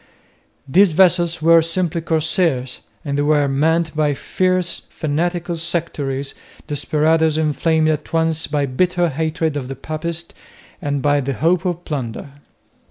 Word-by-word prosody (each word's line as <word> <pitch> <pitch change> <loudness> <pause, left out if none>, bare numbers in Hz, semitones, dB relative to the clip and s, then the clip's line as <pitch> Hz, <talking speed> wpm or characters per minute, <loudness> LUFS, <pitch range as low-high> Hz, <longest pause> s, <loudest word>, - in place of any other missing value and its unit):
These 180 +5 +4
vessels 170 -2 +3
were 165 0 +7
simply 170 0 -1
corsairs 160 -5 0 0.2
and 140 -1 -1
they - - +3
were 145 -1 +3
manned 160 +4 +1
by 150 -2 +1
fierce 185 +4 0
fanatical 170 +3 -2
sectaries, 145 -5 -3 0.3
desperadoes 155 +2 +1
inflamed 160 +1 +1
at 155 -1 -2
once 160 -1 +1
by 145 -1 0
bitter 175 +6 +1
hatred 160 +1 -1
of 135 -3 -3
the 135 - -5
papists 160 +4 -5 0.5
and 145 -4 -2
by 145 0 +3
the 140 +1 -2
hope 165 - +1
of 175 -1 -2
plunder. 135 -2 -5
160 Hz, 135 wpm, -19 LUFS, 145-170 Hz, 0.5 s, were